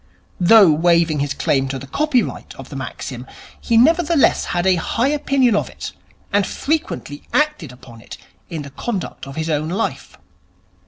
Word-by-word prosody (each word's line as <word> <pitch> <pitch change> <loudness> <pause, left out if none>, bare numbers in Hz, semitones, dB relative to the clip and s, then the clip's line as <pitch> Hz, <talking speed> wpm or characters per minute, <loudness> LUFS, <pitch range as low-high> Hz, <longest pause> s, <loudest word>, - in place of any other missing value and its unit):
Though 190 0 +7
waiving 165 0 +2
his 140 0 -2
claim 135 -1 +1
to 135 0 -4
the 130 - -8
copyright 275 - -1
of - - -11
the - - -9
maxim, - - -6 0.3
he 230 - +1
nevertheless 320 +3 +3
had 175 0 -1
a 190 - +5
high 240 +9 0
opinion 275 -5 +2
of - - -1
it, - - -7 0.4
and 205 0 +3
frequently 305 - -3
acted 300 - 0
upon 125 -2 -14
it - - -10 0.3
in 160 -4 -5
the 140 - -10
conduct 190 - -5
of 135 - -9
his 160 0 -3
own 155 +1 -1
life. 195 +6 -3
175 Hz, 165 wpm, -19 LUFS, -, 0.4 s, Though